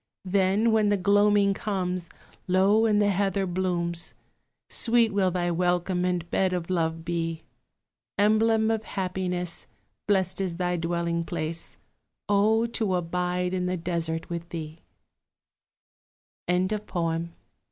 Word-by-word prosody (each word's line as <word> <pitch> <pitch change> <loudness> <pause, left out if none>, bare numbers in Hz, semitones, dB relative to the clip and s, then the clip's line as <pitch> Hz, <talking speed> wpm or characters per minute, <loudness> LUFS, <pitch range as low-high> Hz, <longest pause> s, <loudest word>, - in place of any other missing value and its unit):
Then, 195 +4 +2
when 215 -2 +3
the 205 - +2
gloaming 205 +1 +4
comes, 185 -4 -3 0.4
Low 195 +5 +4
in 210 -1 +3
the 205 -1 +3
heather 195 0 0
blooms, 175 -2 -1 0.5
Sweet 230 -2 +3
will 195 -2 +2
thy 175 -1 -1
welcome 180 +1 0
and 180 -2 -1
bed 190 -1 +1
of 180 0 -3
love 165 -2 -1
be! 165 -1 -2 0.7
Emblem 220 +1 +3
of 220 -1 -1
happiness, 180 -3 -3 0.4
Blest 190 -2 +1
is 180 -3 -2
thy 180 -1 0
dwelling 170 0 -1
place 165 -1 -4 0.5
O 215 +3 +3
to 220 -5 -1
abide 180 +1 -1
in 180 -1 -1
the 180 0 -1
desert 165 -1 -2
with 170 0 -5
thee! 160 -1 -6 1.7
JAMES 185 +4 +1
HOGG. 165 -1 -1
180 Hz, 125 wpm, -26 LUFS, 170-200 Hz, 1.7 s, gloaming